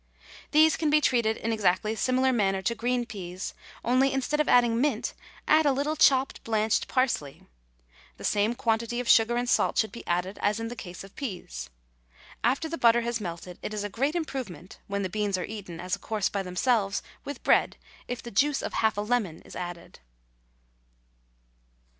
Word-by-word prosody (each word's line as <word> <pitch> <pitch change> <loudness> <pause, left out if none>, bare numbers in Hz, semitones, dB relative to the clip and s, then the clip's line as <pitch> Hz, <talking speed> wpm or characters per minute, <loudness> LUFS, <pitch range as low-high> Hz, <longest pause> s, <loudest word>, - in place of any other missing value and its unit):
These 310 +1 +5
can 315 -2 +1
be 300 +1 +5
treated 235 -6 +2
in 225 +1 -2
exactly 215 +1 +1
similar 255 +2 +2
manner 195 -4 +1
to 235 - +1
green 240 +2 -1
peas, 185 -4 -6 0.3
only, 255 +3 +3
instead 270 +3 -1
of 300 - +2
adding 240 -1 +4
mint, 275 -6 0 0.3
add 310 0 +5
a - - +5
little 285 +3 0
chopped 270 -2 +3
blanched 220 -1 +1
parsley; 245 - -1 0.7
the - - -11
same 210 +3 +1
quantity 230 +1 0
of 245 - -3
sugar 235 +1 +5
and 245 0 -1
salt - - +2
should 220 - +2
be 235 - -9
added 180 +3 -1
as 210 +2 +1
in 225 0 -3
the 240 - -6
case 180 -5 -8
of 195 - -14
peas. 120 - -6 0.7
After 265 +7 +1
the 330 +1 -5
butter 235 0 +5
has 235 -1 -2
melted, 175 -1 -7
it 215 - -4
is 205 - -2
a 205 - -3
great 275 - -1
improvement, 255 - -5
when 200 0 -2
the - - 0
beans 205 0 -1
are 180 - -3
eaten 200 -6 -8
as 180 +2 -1
a - - -16
course 210 -3 -1
by 200 - -2
themselves, 195 +2 0 0.2
with 285 -2 -7
bread, - - +3 0.3
if 245 -1 -5
the 235 - -8
juice 285 +7 +2
of - - -4
half 220 -2 +1
a - - +1
lemon 210 -7 -1
is - - -12
added. 175 -1 -7
225 Hz, 190 wpm, -27 LUFS, 195-255 Hz, 0.7 s, These